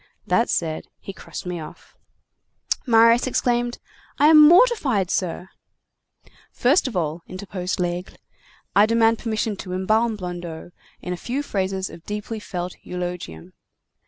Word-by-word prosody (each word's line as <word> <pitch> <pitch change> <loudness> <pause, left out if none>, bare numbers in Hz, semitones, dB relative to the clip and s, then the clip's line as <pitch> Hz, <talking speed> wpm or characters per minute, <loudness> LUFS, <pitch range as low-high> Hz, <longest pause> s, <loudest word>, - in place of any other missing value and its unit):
That 230 - +2
said, 160 -2 -2
he 195 - -8
crossed - - -9
me 180 -1 -4
off." 155 - -12 0.9
Marius 230 +1 +5
exclaimed:— 240 -1 0 0.4
"I 295 - +5
am 305 -1 +9
mortified, 315 - +4
sir—" 180 0 -2 1.0
"First 275 +5 +2
of 230 -7 -4
all," 160 0 -2
interposed 185 0 -5
Laigle, 175 +1 -3 0.6
"I 205 +2 +6
demand 230 0 +3
permission 220 -2 -2
to 185 -1 -7
embalm 215 +5 +1
Blondeau 175 -3 -7 0.3
in 180 - -3
a - - -5
few 260 +9 -3
phrases 190 -5 -2
of 165 - -12
deeply 210 +3 -5
felt 180 -3 -5
eulogium. 175 - -6
200 Hz, 130 wpm, -23 LUFS, 180-235 Hz, 1.0 s, am